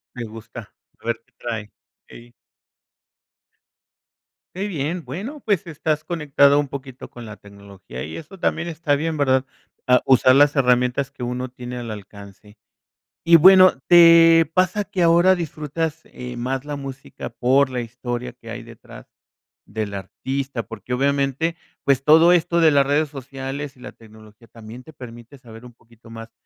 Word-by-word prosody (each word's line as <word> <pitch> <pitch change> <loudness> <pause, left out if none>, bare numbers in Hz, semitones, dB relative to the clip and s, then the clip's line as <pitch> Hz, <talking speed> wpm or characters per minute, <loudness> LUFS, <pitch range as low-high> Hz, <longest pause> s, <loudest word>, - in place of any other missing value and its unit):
Me 120 - -5
gusta, 115 0 -11 0.3
a - - -20
ver 115 -1 -2
qué - - -37
trae, 110 -3 -6 0.4
ey. 120 0 -15 2.2
Qué 195 +2 -3
bien, 165 -2 -4
bueno, 210 - -7
pues, 200 -5 -1
estás 155 -1 -2
conectado 145 -4 +2
un 145 - -1
poquito 130 -2 -9
con 120 - -12
la 105 -1 -10
tecnología 100 -9 -11
y 80 - -7
eso 170 +4 -12
también 170 0 -1
está 160 -3 -1
bien, 160 +2 -2
¿verdad? 130 -3 +1 0.4
Ah, 125 0 +4
usar 130 0 +5
las 145 +1 +4
herramientas 125 +1 +1
que 140 - -15
uno 125 +1 -4
tiene 125 0 -8
al 120 -2 -6
alcance. 100 0 -12 0.7
Y 170 0 +7
bueno, 185 -4 +6
¿te 165 -1 +7
pasa 185 +3 +1
que 190 -2 -4
ahora 170 +2 +5
disfrutas, 160 -2 -4
eh, 125 -1 -9
más 130 +2 -3
la 145 0 -5
música 135 -1 -8
por 130 +2 +2
la 125 -1 -3
historia 120 +1 -6
que 115 -2 -12
hay 120 - -7
detrás 115 -1 -14 0.6
del 110 -2 -5
artista?, 130 +6 -5
porque 115 +3 -7
obviamente, 140 +4 0 0.3
pues, 135 -1 +2
todo 160 +4 +6
esto 170 -1 +1
de 165 -2 +5
las 140 -2 +3
redes 145 +1 0
sociales 135 +1 -7
y 125 - -20
la - - -10
tecnología 110 0 -18
también 115 +2 -12
te 160 - -15
permite 120 0 -12
saber 120 -2 -14
un 120 - -15
poquito 115 0 -22
más 115 0 -10
135 Hz, 160 wpm, -21 LUFS, 120-155 Hz, 2.2 s, Y